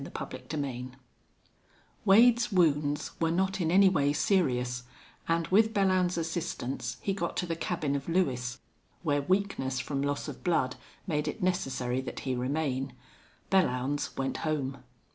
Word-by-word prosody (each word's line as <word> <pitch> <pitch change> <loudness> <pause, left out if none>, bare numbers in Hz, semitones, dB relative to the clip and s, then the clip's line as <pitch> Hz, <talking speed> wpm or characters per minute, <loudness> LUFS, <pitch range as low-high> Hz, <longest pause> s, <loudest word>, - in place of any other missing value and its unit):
CHAPTER - - -6
XVIII 130 -4 -4 1.1
Wade's 235 +4 +6
wounds 150 -5 +2
were 165 - +2
not 190 +3 0
in 160 - +1
any 195 +3 +6
way 145 -6 +2
serious, 125 -8 +1 0.5
and 165 0 +1
with 220 +4 +4
Belllounds's 185 -3 +2
assistance 140 -7 -3
he 195 - 0
got 175 -3 -3
to - - 0
the 165 -1 -2
cabin 160 -4 -1
of 140 +3 -4
Lewis, 125 -9 0 0.5
where 145 -3 +1
weakness 185 -7 0
from 135 +2 -2
loss 145 +1 -1
of 145 - -8
blood 160 -7 +1 0.3
made 150 -4 -1
it 205 - -4
necessary 130 -8 0
that 130 - -6
he 130 - -2
remain. 135 0 -1 0.6
Belllounds 145 -6 +1
went 135 0 -1
home. 140 -4 -2
155 Hz, 145 wpm, -29 LUFS, 135-185 Hz, 1.1 s, Wade's